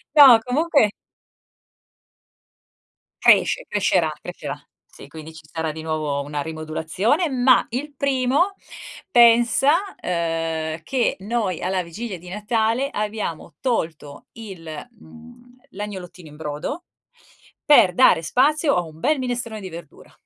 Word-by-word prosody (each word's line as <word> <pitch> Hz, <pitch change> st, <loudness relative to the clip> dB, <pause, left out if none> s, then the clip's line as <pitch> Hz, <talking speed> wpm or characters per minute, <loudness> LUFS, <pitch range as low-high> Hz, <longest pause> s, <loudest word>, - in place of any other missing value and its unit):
No, 270 Hz, -6 st, +9 dB
comunque 280 Hz, -3 st, +2 dB, 2.3 s
cresce, -, -, +4 dB
crescerà, -, -, +1 dB
crescerà. -, -, -7 dB, 0.3 s
Sì, -, -, -14 dB
quindi 160 Hz, 0 st, -10 dB
ci 160 Hz, -, -13 dB
sarà 160 Hz, -1 st, -3 dB
di 160 Hz, +1 st, -8 dB
nuovo 155 Hz, -3 st, -2 dB
una 145 Hz, +1 st, -4 dB
rimodulazione, 160 Hz, -, -1 dB
ma 255 Hz, -1 st, +4 dB
il 285 Hz, +5 st, -5 dB
primo 275 Hz, +7 st, +1 dB, 0.6 s
pensa, 240 Hz, +3 st, +5 dB, 0.3 s
uhm, 165 Hz, -2 st, -2 dB
che 245 Hz, +9 st, -1 dB
noi 200 Hz, -3 st, -2 dB
alla 185 Hz, 0 st, -1 dB
vigilia 190 Hz, +4 st, -7 dB
di 175 Hz, +1 st, -13 dB
Natale 225 Hz, +6 st, -1 dB
abbiamo 210 Hz, -, -5 dB
tolto 160 Hz, -, -3 dB
il 200 Hz, -7 st, -10 dB, 0.3 s
mhmm, 240 Hz, +1 st, -17 dB
l'agnolottino 185 Hz, -5 st, -8 dB
in 150 Hz, -, -14 dB
brodo, 150 Hz, -, -5 dB, 0.8 s
per 285 Hz, -11 st, +6 dB
dare 170 Hz, -2 st, +4 dB
spazio 290 Hz, -, +2 dB
a 175 Hz, -, +2 dB
un 160 Hz, -2 st, -12 dB
bel 290 Hz, -, +1 dB
minestrone 240 Hz, -4 st, -4 dB
di 190 Hz, -, -7 dB
verdura. 165 Hz, -2 st, -12 dB
210 Hz, 120 wpm, -22 LUFS, 160-250 Hz, 2.3 s, No